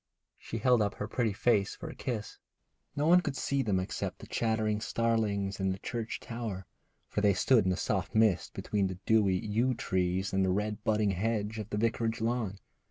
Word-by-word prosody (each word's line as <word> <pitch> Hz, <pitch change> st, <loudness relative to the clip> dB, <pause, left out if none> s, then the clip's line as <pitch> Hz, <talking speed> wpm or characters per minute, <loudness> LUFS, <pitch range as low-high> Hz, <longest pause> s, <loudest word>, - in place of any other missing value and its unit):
She 115 Hz, -, -5 dB
held 125 Hz, +1 st, +4 dB
up 100 Hz, -1 st, 0 dB
her 105 Hz, -, -4 dB
pretty 115 Hz, -2 st, 0 dB
face 100 Hz, 0 st, +1 dB
for 165 Hz, -, -8 dB
a 155 Hz, -, -6 dB
kiss. 115 Hz, -6 st, -4 dB, 0.6 s
No 145 Hz, -, 0 dB
one 175 Hz, +3 st, +6 dB
could 145 Hz, -5 st, -3 dB
see 140 Hz, 0 st, 0 dB
them 100 Hz, -7 st, +1 dB
except 95 Hz, -, -3 dB
the -, -, -11 dB
chattering 110 Hz, -2 st, 0 dB
starlings 110 Hz, -4 st, 0 dB
in 95 Hz, 0 st, +1 dB
the 95 Hz, -, -1 dB
church 115 Hz, +2 st, -4 dB
tower, 110 Hz, -6 st, -5 dB, 0.4 s
for 105 Hz, -, -2 dB
they 100 Hz, -2 st, +4 dB
stood 115 Hz, +1 st, +4 dB
in -, -, +2 dB
the 90 Hz, -, 0 dB
soft 100 Hz, +2 st, -1 dB
mist 110 Hz, -4 st, +2 dB
between 100 Hz, -2 st, 0 dB
the 95 Hz, -1 st, -5 dB
dewy 105 Hz, -4 st, +4 dB
yew 115 Hz, +5 st, +1 dB
trees 95 Hz, -1 st, -1 dB
and 95 Hz, 0 st, +3 dB
the 95 Hz, -, +2 dB
red 105 Hz, +3 st, -1 dB
budding 105 Hz, -2 st, +2 dB
hedge 105 Hz, +2 st, -1 dB
by 110 Hz, -, -3 dB
the 105 Hz, -, -2 dB
vicarage 115 Hz, +1 st, 0 dB
lawn. 115 Hz, -3 st, -1 dB
105 Hz, 200 wpm, -31 LUFS, 100-115 Hz, 0.6 s, one